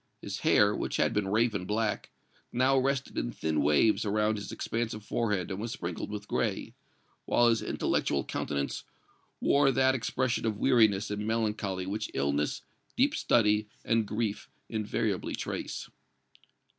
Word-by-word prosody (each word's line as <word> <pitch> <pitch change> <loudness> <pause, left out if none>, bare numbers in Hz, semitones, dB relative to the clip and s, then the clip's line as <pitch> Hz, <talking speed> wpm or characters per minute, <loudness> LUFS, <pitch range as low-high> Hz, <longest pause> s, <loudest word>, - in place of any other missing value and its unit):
His - - -5
hair, - - +4
which - - -2
had - - +2
been 105 -2 0
raven 105 -2 +1
black, 105 +1 -1 0.4
now 130 +2 +3
rested 135 +1 -1
in 120 - -2
thin 80 -7 -1
waves 75 +9 +3
around 105 +1 +1
his 105 - -6
expansive 110 -2 -3
forehead 105 -7 -1
and 95 - -3
was 115 +1 -3
sprinkled 85 -9 -5
with 105 0 -6
gray, - - -1 0.5
while 120 0 +4
his 115 -2 +2
intellectual 70 -1 0
countenance 70 -1 -3 0.6
wore 140 -1 +4
that 130 0 +3
expression 125 -1 -1
of 110 -2 -1
weariness 105 -5 +3
and 105 +1 -3
melancholy 105 -4 -1
which 105 +3 -3
illness, 70 +2 0 0.3
deep - - +3
study 105 -2 +2 0.2
and 115 -2 +2
grief 105 -1 -2 0.2
invariably 110 -2 -1
trace. - - -4
105 Hz, 145 wpm, -29 LUFS, 100-115 Hz, 0.6 s, hair